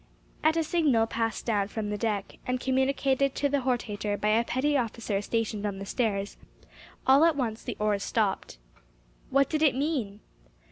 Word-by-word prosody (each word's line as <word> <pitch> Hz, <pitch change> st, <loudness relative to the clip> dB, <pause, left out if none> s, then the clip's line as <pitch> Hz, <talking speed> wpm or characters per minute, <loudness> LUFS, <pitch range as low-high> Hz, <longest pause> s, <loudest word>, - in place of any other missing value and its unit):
At 315 Hz, +1 st, +3 dB
a 325 Hz, -, +2 dB
signal 300 Hz, -9 st, +2 dB
passed 225 Hz, 0 st, -2 dB
down 205 Hz, -4 st, +1 dB
from 210 Hz, 0 st, -4 dB
the -, -, -1 dB
deck, 205 Hz, -2 st, -3 dB
and 250 Hz, 0 st, 0 dB
communicated 265 Hz, +1 st, +1 dB
to 285 Hz, -, +1 dB
the 285 Hz, 0 st, +1 dB
hortator 215 Hz, -5 st, -1 dB
by 210 Hz, -, +1 dB
a 225 Hz, +2 st, +3 dB
petty 275 Hz, +5 st, 0 dB
officer 230 Hz, -5 st, -1 dB
stationed 220 Hz, -1 st, -2 dB
on 205 Hz, -2 st, -2 dB
the 195 Hz, -, -6 dB
stairs, 200 Hz, -3 st, -1 dB, 0.7 s
all 270 Hz, +3 st, +6 dB
at 330 Hz, -2 st, +4 dB
once 235 Hz, -5 st, -2 dB
the 240 Hz, -, -5 dB
oars 210 Hz, -1 st, +1 dB
stopped. 205 Hz, -, -1 dB, 0.7 s
What 275 Hz, 0 st, +3 dB
did 310 Hz, 0 st, -1 dB
it 295 Hz, -5 st, +4 dB
mean? 260 Hz, -8 st, -2 dB
235 Hz, 175 wpm, -28 LUFS, 210-275 Hz, 0.7 s, all